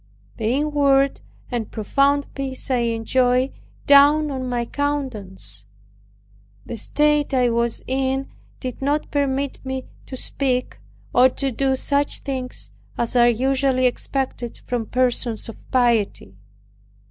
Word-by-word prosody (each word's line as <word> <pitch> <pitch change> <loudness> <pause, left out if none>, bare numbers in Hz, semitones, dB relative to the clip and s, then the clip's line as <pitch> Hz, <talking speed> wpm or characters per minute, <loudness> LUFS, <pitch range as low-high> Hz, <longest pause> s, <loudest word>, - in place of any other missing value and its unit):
The 220 - -3
inward 275 +1 +2 0.3
and 235 -3 -2
profound 280 +6 +1
peace 270 -1 -3
I 255 - +3
enjoyed 245 +3 +1 0.3
dawned 290 +1 +6
on 260 -2 -3
my 240 -1 -1
countenance. 245 - -3 1.0
The - - -5
state 295 +3 +1
I 250 -2 +3
was 235 0 0
in 265 +1 -1 0.3
did 255 0 -6
not 290 +2 0
permit 280 -1 -1
me 265 -1 -4 0.2
to 260 - -6
speak, 255 -1 -1 0.3
or 255 +1 +6
to 270 +1 -2
do 265 +2 +1
such 285 +2 0
things 260 -3 -3 0.3
as 235 +1 0
are 240 0 +6
usually 260 +2 +2
expected 250 -1 -2
from 240 -3 -2
persons 245 -3 +1
of 225 - -8
piety. 230 - +1
260 Hz, 125 wpm, -22 LUFS, 240-275 Hz, 1.0 s, dawned